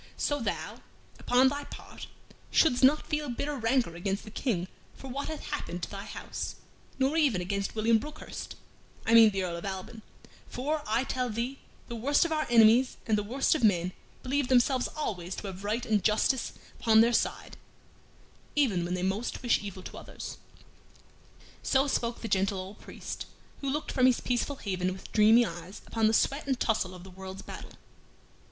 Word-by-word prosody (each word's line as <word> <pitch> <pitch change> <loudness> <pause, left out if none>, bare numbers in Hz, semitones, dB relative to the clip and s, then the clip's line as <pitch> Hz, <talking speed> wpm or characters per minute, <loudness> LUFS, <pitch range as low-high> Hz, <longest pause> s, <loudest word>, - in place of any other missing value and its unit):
So 290 0 0
thou, 230 - -3 0.4
upon 250 +2 +4
thy 285 +1 -4
part, - - -10 0.4
shouldst 260 -6 +3
not 290 +4 +5
feel 300 -2 -2
bitter 285 +4 -2
rancor 235 -6 +1
against 195 +3 -2
the 215 - -10
King 195 -7 -1 0.3
for 270 - -9
what 275 +3 -3
hath 315 -1 -6
happed 180 -11 -3
to - - -3
thy 200 0 -6
house, - - -5 0.4
nor 270 +4 +2
even 280 - +3
against 200 +3 -2
William 225 +1 +3
Brookhurst 300 +6 -8 0.5
I 225 - +2
mean 225 -1 +9
the 195 -2 -2
Earl 170 -2 -3
of 170 - -8
Alban 195 +4 -6 0.5
for, 295 +5 -2
I 225 +4 +2
tell 255 -2 -2
thee, 235 +5 -3 0.3
the 235 - -5
worst 280 +8 +3
of 335 - -2
our 310 -1 0
enemies 235 +2 +6
and 220 - +2
the 210 - +1
worst 250 +7 +1
of 310 - -1
men 180 -4 +3 0.3
believe 275 +1 0
themselves 255 0 +3
always 185 - -4
to - - -7
have 190 0 -7
right 220 +4 -1
and 215 -4 +1
justice 220 +4 +2 0.3
upon 220 -1 +6
their 235 +1 +4
side, - - -1 1.0
even 230 -12 +2
when 175 +1 -2
they 180 - -3
most 200 +7 -2
wish 240 - +3
evil 195 -2 -7
to - - -8
others." - - -8 1.2
So 270 +1 +3
spoke 235 -3 -1
the 230 - -3
gentle 195 -1 +1
old 190 +3 -7
priest, - - -7 0.3
who 275 - -2
looked 300 +3 -2
from 255 -1 +4
his 255 - +3
peaceful 250 +3 -1
haven 185 -6 -2
with 190 - -11
dreamy 225 +2 +6
eyes 175 +1 -8
upon 225 -1 +1
the 220 - +2
sweat 280 +5 +1
and 265 -2 0
tussle 195 -5 0
of 180 - -11
the 190 - -11
world's 190 +1 -8
battle. - - -9
230 Hz, 185 wpm, -29 LUFS, 195-265 Hz, 1.2 s, mean